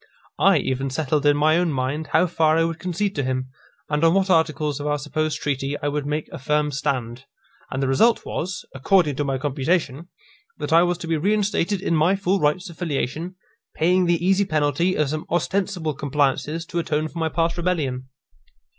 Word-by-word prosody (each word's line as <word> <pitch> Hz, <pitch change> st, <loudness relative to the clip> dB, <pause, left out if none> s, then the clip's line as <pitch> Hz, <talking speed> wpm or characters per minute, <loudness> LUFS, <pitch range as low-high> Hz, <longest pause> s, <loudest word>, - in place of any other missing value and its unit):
I -, -, +5 dB
even 135 Hz, +1 st, -1 dB
settled 145 Hz, +1 st, 0 dB
in 145 Hz, 0 st, +4 dB
my 155 Hz, +2 st, +3 dB
own 175 Hz, -2 st, +1 dB
mind 140 Hz, +3 st, -2 dB
how -, -, +3 dB
far 160 Hz, -2 st, +2 dB
I 165 Hz, -, +3 dB
would 165 Hz, 0 st, -2 dB
concede 185 Hz, +2 st, -2 dB
to 145 Hz, -, 0 dB
him, 130 Hz, 0 st, -2 dB, 0.4 s
and 150 Hz, +1 st, -1 dB
on 165 Hz, +2 st, +5 dB
what 195 Hz, -1 st, +2 dB
articles 155 Hz, -3 st, +1 dB
of 145 Hz, -, -4 dB
our 145 Hz, 0 st, +1 dB
supposed 150 Hz, +1 st, -2 dB
treaty 140 Hz, 0 st, -2 dB
I 145 Hz, -, -1 dB
would 145 Hz, 0 st, -3 dB
make 150 Hz, +1 st, -2 dB
a -, -, -7 dB
firm 150 Hz, +2 st, 0 dB
stand; 130 Hz, -3 st, -3 dB, 0.4 s
and 135 Hz, +1 st, -2 dB
the -, -, +1 dB
result 225 Hz, -, +3 dB
was, 180 Hz, +2 st, -4 dB
according 150 Hz, +2 st, +2 dB
to 145 Hz, -, 0 dB
my 135 Hz, -2 st, -1 dB
computation, 145 Hz, +3 st, -1 dB, 0.5 s
that -, -, -3 dB
I 165 Hz, -, +7 dB
was 175 Hz, 0 st, +1 dB
to 170 Hz, -, -6 dB
be 165 Hz, -1 st, +1 dB
reinstated 200 Hz, +1 st, 0 dB
in 170 Hz, -, +1 dB
my 160 Hz, +5 st, +3 dB
full 195 Hz, 0 st, 0 dB
rights 150 Hz, +5 st, +1 dB
of 165 Hz, -, -16 dB
filiation, 165 Hz, +2 st, -3 dB, 0.4 s
paying 180 Hz, +3 st, +2 dB
the 170 Hz, 0 st, +1 dB
easy 195 Hz, +1 st, +3 dB
penalty 155 Hz, +1 st, +1 dB
of 150 Hz, -2 st, +1 dB
some 155 Hz, +2 st, -4 dB
ostensible 175 Hz, -1 st, -1 dB
compliances 145 Hz, +3 st, -1 dB
to 170 Hz, +1 st, -3 dB
atone 155 Hz, -2 st, -1 dB
for 165 Hz, -, -8 dB
my 160 Hz, -1 st, 0 dB
past 165 Hz, +1 st, 0 dB
rebellion. 150 Hz, -8 st, -2 dB
155 Hz, 200 wpm, -23 LUFS, 145-175 Hz, 0.5 s, I